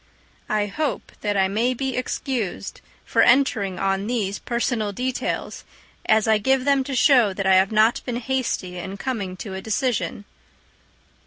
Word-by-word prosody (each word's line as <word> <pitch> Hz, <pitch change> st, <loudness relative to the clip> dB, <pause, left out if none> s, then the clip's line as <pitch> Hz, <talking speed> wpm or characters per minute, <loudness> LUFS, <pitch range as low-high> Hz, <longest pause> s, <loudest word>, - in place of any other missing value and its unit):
I 210 Hz, -1 st, +1 dB
hope 265 Hz, +3 st, -3 dB
that 205 Hz, -1 st, -1 dB
I 190 Hz, -1 st, +3 dB
may 230 Hz, +6 st, 0 dB
be 265 Hz, +1 st, -2 dB
excused 250 Hz, -5 st, -3 dB, 0.2 s
for -, -, +2 dB
entering 220 Hz, -8 st, +3 dB
on 195 Hz, +2 st, -1 dB
these 210 Hz, -5 st, -1 dB
personal 235 Hz, -3 st, -1 dB
details, 250 Hz, +5 st, -3 dB, 0.4 s
as 220 Hz, 0 st, +3 dB
I 220 Hz, -1 st, +4 dB
give 265 Hz, +4 st, +1 dB
them 280 Hz, -1 st, +3 dB
to 270 Hz, -1 st, -3 dB
show 250 Hz, -7 st, +5 dB
that 195 Hz, -, -3 dB
I 190 Hz, -, +5 dB
have 190 Hz, +2 st, +4 dB
not 220 Hz, +2 st, +3 dB
been 245 Hz, -2 st, -3 dB
hasty 235 Hz, -8 st, -2 dB
in 190 Hz, +3 st, -6 dB
coming 200 Hz, -6 st, -4 dB
to 195 Hz, +1 st, -7 dB
a 190 Hz, -, -5 dB
decision. 220 Hz, -1 st, -2 dB
220 Hz, 160 wpm, -23 LUFS, 195-255 Hz, 0.4 s, show